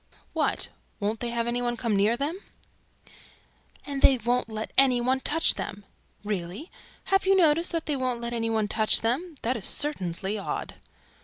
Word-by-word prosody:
"What? -, -, 0 dB, 0.3 s
WON'T 210 Hz, +1 st, -2 dB
THEY 240 Hz, -, -2 dB
HAVE 235 Hz, 0 st, -1 dB
ANY 240 Hz, +1 st, -1 dB
ONE 240 Hz, -1 st, -1 dB
COME 230 Hz, -3 st, 0 dB
NEAR 210 Hz, +4 st, +2 dB
THEM?" 300 Hz, +7 st, -2 dB, 1.5 s
"AND 280 Hz, -1 st, -4 dB
THEY 265 Hz, -, +6 dB
WON'T 240 Hz, +1 st, -1 dB
LET 220 Hz, 0 st, -5 dB
ANY 260 Hz, -2 st, +5 dB
ONE 255 Hz, +2 st, +1 dB
TOUCH 325 Hz, +5 st, +3 dB
THEM!" 200 Hz, 0 st, -6 dB, 0.4 s
"Really? 205 Hz, -, -5 dB, 0.4 s
Have 385 Hz, 0 st, +3 dB
you 390 Hz, -, +5 dB
noticed 335 Hz, -1 st, +3 dB
THAT 330 Hz, -2 st, -2 dB
THEY 295 Hz, -, 0 dB
WON'T 255 Hz, -2 st, -1 dB
LET 235 Hz, 0 st, -4 dB
ANY 225 Hz, -1 st, -1 dB
ONE 220 Hz, -2 st, 0 dB
TOUCH 215 Hz, +1 st, +3 dB
THEM? 295 Hz, +9 st, -1 dB
That 245 Hz, +2 st, 0 dB
is 205 Hz, -, 0 dB
certainly 195 Hz, -, -1 dB
odd!" 195 Hz, -, -4 dB
240 Hz, 175 wpm, -26 LUFS, 215-280 Hz, 1.5 s, THEY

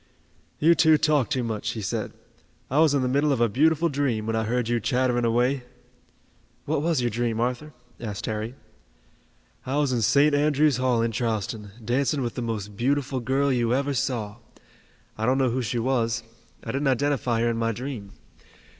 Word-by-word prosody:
"You 165 Hz, +3 st, +5 dB
two 160 Hz, -1 st, +5 dB
talk 150 Hz, -4 st, +2 dB
too 130 Hz, -, 0 dB
much," 115 Hz, 0 st, -3 dB
he 110 Hz, -, -5 dB
said. -, -, -3 dB, 0.6 s
"I 140 Hz, -, +2 dB
was 155 Hz, -3 st, +4 dB
in 135 Hz, -, +1 dB
the -, -, +1 dB
middle 140 Hz, +3 st, +2 dB
of 135 Hz, -, +1 dB
a 120 Hz, -, +4 dB
beautiful 155 Hz, +8 st, +2 dB
dream, 135 Hz, -7 st, -1 dB
when 115 Hz, 0 st, -1 dB
I 110 Hz, 0 st, 0 dB
heard 120 Hz, +1 st, -1 dB
you 120 Hz, 0 st, +1 dB
chattering 125 Hz, 0 st, +1 dB
away." 125 Hz, +4 st, +1 dB, 1.0 s
"What -, -, 0 dB
was 160 Hz, -4 st, +1 dB
your 120 Hz, -1 st, 0 dB
dream, 115 Hz, 0 st, -1 dB
Arthur?" 125 Hz, +5 st, -2 dB, 0.3 s
asked 105 Hz, -4 st, -5 dB
Harry. 110 Hz, +3 st, -4 dB, 1.1 s
"I 135 Hz, +3 st, -2 dB
was 145 Hz, -3 st, +1 dB
in 120 Hz, -, 0 dB
St. 140 Hz, +6 st, +4 dB
Andrew's 145 Hz, -1 st, +3 dB
Hall 125 Hz, -2 st, +1 dB
in 115 Hz, -, 0 dB
Charleston, 110 Hz, -2 st, -3 dB, 0.2 s
dancing 135 Hz, +4 st, +1 dB
with 120 Hz, -, -3 dB
the -, -, -4 dB
most 105 Hz, -3 st, -4 dB
beautiful 135 Hz, +3 st, 0 dB
girl 135 Hz, +3 st, +1 dB
you 120 Hz, -1 st, +1 dB
ever 140 Hz, +1 st, 0 dB
saw. 110 Hz, -4 st, -2 dB, 0.8 s
I 110 Hz, -, 0 dB
don't 130 Hz, +1 st, +3 dB
know 130 Hz, -3 st, +2 dB
who 130 Hz, +2 st, -1 dB
she 120 Hz, +1 st, -2 dB
was, 115 Hz, -1 st, 0 dB, 0.4 s
I -, -, -4 dB
didn't 140 Hz, +1 st, -1 dB
identify 130 Hz, -3 st, +1 dB
her 120 Hz, -, +2 dB
in 115 Hz, -, -3 dB
my 115 Hz, 0 st, 0 dB
dream. 115 Hz, -4 st, -6 dB
125 Hz, 190 wpm, -25 LUFS, 115-140 Hz, 1.1 s, You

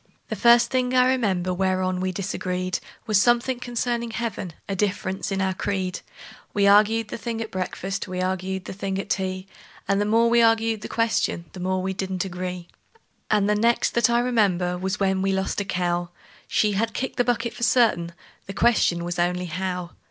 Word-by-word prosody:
The -, -, -2 dB
first 235 Hz, 0 st, +5 dB
thing 255 Hz, -1 st, +1 dB
I 250 Hz, 0 st, +5 dB
remember 190 Hz, -8 st, 0 dB
whereon 185 Hz, 0 st, 0 dB
we 185 Hz, 0 st, -1 dB
disagreed 185 Hz, -1 st, -2 dB, 0.3 s
Was 210 Hz, -2 st, +3 dB
something 240 Hz, +2 st, +2 dB
concerning 240 Hz, -1 st, -2 dB
heaven 225 Hz, -6 st, -4 dB
a 195 Hz, -, -2 dB
difference 190 Hz, -1 st, -2 dB
in 195 Hz, 0 st, 0 dB
our 190 Hz, 0 st, 0 dB
creed; 185 Hz, -1 st, -2 dB, 0.6 s
We 205 Hz, -, +2 dB
arg'ed 210 Hz, +2 st, +4 dB
the -, -, -5 dB
thing 230 Hz, +1 st, -4 dB
at 225 Hz, -1 st, -5 dB
breakfast, 190 Hz, +1 st, -3 dB
we 185 Hz, 0 st, -5 dB
arg'ed 190 Hz, 0 st, -2 dB
the -, -, -6 dB
thing 195 Hz, 0 st, -3 dB
at 195 Hz, -, -4 dB
tea, 185 Hz, -1 st, -2 dB, 0.4 s
And 200 Hz, +1 st, +2 dB
the -, -, +1 dB
more 225 Hz, +2 st, +3 dB
we 235 Hz, 0 st, +4 dB
arg'ed 225 Hz, -1 st, +2 dB
the -, -, -5 dB
question 225 Hz, -6 st, 0 dB
the 185 Hz, -, -9 dB
more 185 Hz, +1 st, -1 dB
we 190 Hz, 0 st, -1 dB
didn't 190 Hz, -1 st, -3 dB
agree. 180 Hz, -1 st, -5 dB, 0.6 s
And 210 Hz, -2 st, +3 dB
the 210 Hz, -, +3 dB
next 230 Hz, +3 st, +2 dB
that 235 Hz, -1 st, +3 dB
I 235 Hz, 0 st, +3 dB
remember 195 Hz, -8 st, +1 dB
was 190 Hz, +3 st, -3 dB
when 190 Hz, -1 st, +1 dB
we 195 Hz, 0 st, +1 dB
lost 190 Hz, +1 st, -1 dB
a -, -, -4 dB
cow; 175 Hz, -1 st, -1 dB, 0.4 s
She 210 Hz, -, +2 dB
had 220 Hz, +3 st, -1 dB
kicked 260 Hz, -, -3 dB
the 245 Hz, -, +4 dB
bucket 235 Hz, -1 st, -1 dB
for -, -, -11 dB
certain, 220 Hz, -7 st, +3 dB, 0.4 s
the 195 Hz, -, -5 dB
question 200 Hz, -7 st, +3 dB
was 175 Hz, 0 st, -3 dB
only 180 Hz, +1 st, 0 dB
How? 180 Hz, 0 st, -4 dB
195 Hz, 195 wpm, -24 LUFS, 185-225 Hz, 0.6 s, first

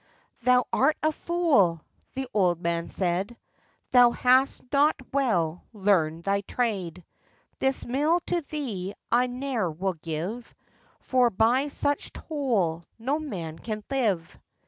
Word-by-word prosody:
'Thou 250 Hz, +1 st, +4 dB
art 290 Hz, +4 st, +3 dB
a 310 Hz, -, +3 dB
fool!' 300 Hz, -, +2 dB, 0.4 s
the 265 Hz, 0 st, -3 dB
old 180 Hz, -5 st, +2 dB
man 170 Hz, -1 st, -1 dB
said, 190 Hz, +5 st, -1 dB, 0.5 s
'Thou 245 Hz, -1 st, +7 dB
hast 255 Hz, +3 st, +2 dB
not 290 Hz, +2 st, +4 dB, 0.2 s
well 180 Hz, -, +1 dB
learned 175 Hz, -6 st, +1 dB
thy 200 Hz, +1 st, +1 dB
trade; 190 Hz, -7 st, -3 dB, 0.5 s
This 265 Hz, 0 st, 0 dB
mill 295 Hz, +7 st, +2 dB
to 345 Hz, 0 st, -1 dB
thee 210 Hz, -11 st, -4 dB, 0.2 s
I 245 Hz, +2 st, +4 dB
ne'er 250 Hz, -6 st, -2 dB
will 185 Hz, +4 st, -2 dB
give, 170 Hz, +9 st, -5 dB, 0.5 s
For 250 Hz, -2 st, +3 dB
by 235 Hz, +7 st, +2 dB
such 285 Hz, 0 st, -1 dB
toll 210 Hz, -, -1 dB
no 265 Hz, +7 st, -1 dB
man 170 Hz, -, -6 dB
can 215 Hz, -2 st, -5 dB
live. 210 Hz, -11 st, -1 dB
230 Hz, 125 wpm, -26 LUFS, 180-270 Hz, 0.5 s, Thou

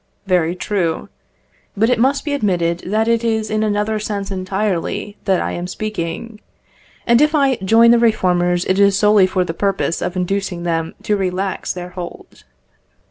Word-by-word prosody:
Very 180 Hz, -3 st, +1 dB
true. 180 Hz, -4 st, -2 dB, 0.7 s
But 225 Hz, +4 st, +3 dB
it 250 Hz, -, +1 dB
must 270 Hz, +5 st, +1 dB
be 290 Hz, -, -1 dB
admitted 175 Hz, -9 st, 0 dB
that 215 Hz, +3 st, +1 dB
it 230 Hz, 0 st, +2 dB
is 220 Hz, -2 st, -1 dB
in 215 Hz, 0 st, 0 dB
another 215 Hz, 0 st, 0 dB
sense 205 Hz, -2 st, -4 dB
entirely 190 Hz, +1 st, -2 dB
that 190 Hz, -2 st, +2 dB
I -, -, -2 dB
am 175 Hz, +1 st, -4 dB
speaking; 210 Hz, +2 st, -5 dB, 0.7 s
and 235 Hz, +2 st, +4 dB
if 300 Hz, +1 st, +3 dB
I 275 Hz, -4 st, +3 dB
join 225 Hz, +5 st, +5 dB
the 235 Hz, -, +5 dB
reformers 180 Hz, -6 st, +2 dB
it 190 Hz, +1 st, +1 dB
is 200 Hz, -1 st, +4 dB
solely 210 Hz, -2 st, +5 dB
for 185 Hz, -1 st, 0 dB
the 165 Hz, -, -4 dB
purpose 195 Hz, -1 st, -1 dB
of 180 Hz, -, -3 dB
inducing 185 Hz, -1 st, -2 dB
them 165 Hz, -1 st, -2 dB
to 210 Hz, -, +1 dB
relax 190 Hz, 0 st, -2 dB
their 180 Hz, 0 st, -6 dB
hold. 180 Hz, -1 st, -10 dB
195 Hz, 170 wpm, -18 LUFS, 180-220 Hz, 0.7 s, join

